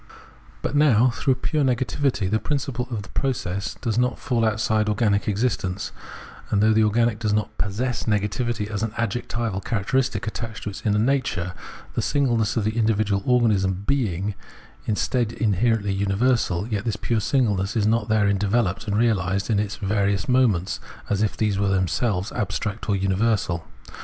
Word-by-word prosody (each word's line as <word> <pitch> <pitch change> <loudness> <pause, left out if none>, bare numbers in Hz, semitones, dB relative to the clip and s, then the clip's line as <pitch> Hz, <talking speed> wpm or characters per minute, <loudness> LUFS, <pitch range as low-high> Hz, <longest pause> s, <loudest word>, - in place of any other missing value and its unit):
But - - -2
now, 130 -5 +4
though 130 - +4
pure 150 +3 0
negativity, 130 -3 0
the 110 +3 +1
principle 130 -1 -2
of 110 -5 -3
the - - -13
process, 100 -8 -2
does 115 0 -1
not 125 0 +1
fall 120 -5 0
outside 110 0 +1
organic 105 -1 +1
existence, 105 -3 -1 0.6
and 100 - +2
though 110 +1 +4
the 110 0 +4
organic 115 +1 +2
does 110 -3 0
not 105 0 -1
possess 115 +5 -1
negativity 105 +1 -1
as 105 -1 -4
an 110 -1 -2
adjectival 115 -3 -2
characteristic 115 +2 0
attached 115 -1 -5
to 105 - -3
its - - -8
inner 105 -1 +2
nature, 105 -8 0 0.4
the - - 0
singleness 120 -6 +1
of 110 - +1
the 110 +2 -1
individual 110 -3 +1
organism 100 -6 +2
being 105 -7 0 0.5
instead 115 +2 0
inherently 105 -1 +1
universal, 100 -1 +1
yet 105 -4 -2
this 110 -3 -1
pure 115 +1 -1
singleness 105 -5 +1
is 110 -3 +2
not 115 +2 +1
therein 100 -2 +2
developed 105 0 0
and 105 0 0
reahsed 100 -3 +1
in 105 - +3
its 105 0 -2
various 100 -2 0
moments 110 -5 +2 0.3
as 100 0 +1
if 110 - 0
these 105 -3 +1
were 100 -1 +2
themselves 95 +1 0
abstract 105 +2 -3
or 100 - +3
universal. 95 -3 0
110 Hz, 160 wpm, -24 LUFS, 100-120 Hz, 0.6 s, now